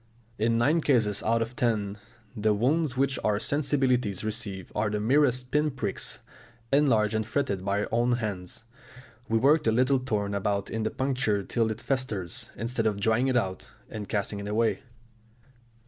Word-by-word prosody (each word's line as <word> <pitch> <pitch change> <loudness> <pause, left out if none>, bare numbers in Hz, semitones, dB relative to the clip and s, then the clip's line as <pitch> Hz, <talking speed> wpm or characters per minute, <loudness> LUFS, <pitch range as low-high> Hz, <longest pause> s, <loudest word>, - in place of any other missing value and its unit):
In 115 +1 +2
nine 150 +8 +3
cases 110 -9 +2
out 115 +1 +2
of 115 +2 -9
ten, 105 -4 0 0.4
the 105 0 +2
wounds 135 +4 +1
which 135 0 +1
our 105 -1 +2
sensibilities 130 -8 +1
receive 105 -4 -4
are 105 0 0
the 105 +1 -1
merest 125 +2 +2
pin 150 +1 +2
pricks, 115 -8 -3 0.6
enlarged 115 -7 +3
and 110 0 +1
fretted 105 -5 -2
by 100 +1 0
our - - -3
own 120 +2 +2
hands; 105 -4 -4 0.7
we 115 - +3
work 150 +6 +4
the 110 - +2
little 130 +4 +3
thorn 105 -5 -2
about 100 0 -1
in 110 - -2
the 110 - 0
puncture 125 -7 0
till 115 +2 0
it 110 +1 -5
festers, 115 -10 -3
instead 115 0 -1
of 105 -2 -1
drawing 110 +5 +2
it 130 -2 +2
out 95 -5 -2 0.2
and 105 -2 -6
casting 100 -1 -2
it 100 - -6
away. 110 +2 +1
115 Hz, 170 wpm, -27 LUFS, 105-130 Hz, 0.7 s, work